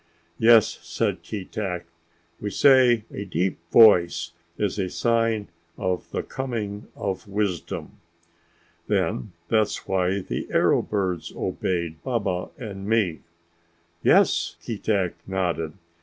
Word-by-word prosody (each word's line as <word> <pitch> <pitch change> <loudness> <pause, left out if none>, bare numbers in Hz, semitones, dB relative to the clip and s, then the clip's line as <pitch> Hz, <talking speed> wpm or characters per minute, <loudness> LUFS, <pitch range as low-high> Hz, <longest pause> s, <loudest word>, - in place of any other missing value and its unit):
"Yes," 115 -1 +5
said - - -2
Keetack. 95 -3 -4 0.5
"We 105 - -3
say 125 -2 +5
a 100 - -4
deep 95 -1 -1
voice 85 -6 +6 0.3
is 105 0 -1
a 95 -2 -1
sign 115 -2 +1 0.3
of 90 -1 -2
the - - -3
coming 110 -6 -4
of 95 +3 -4
wisdom." 100 -3 -3 0.9
"Then 105 - -1 0.2
that's 110 -2 +1
why 95 +1 +1
the - - -4
arrow - - +3
birds 95 -5 -2
obeyed 85 -3 -2
Baba 100 -8 -2
and 100 -4 -7
me?" 105 -8 +2 0.8
"Yes," - - +3
Keetack 100 -5 -1
nodded. 90 -4 -1
100 Hz, 110 wpm, -25 LUFS, 90-110 Hz, 0.9 s, voice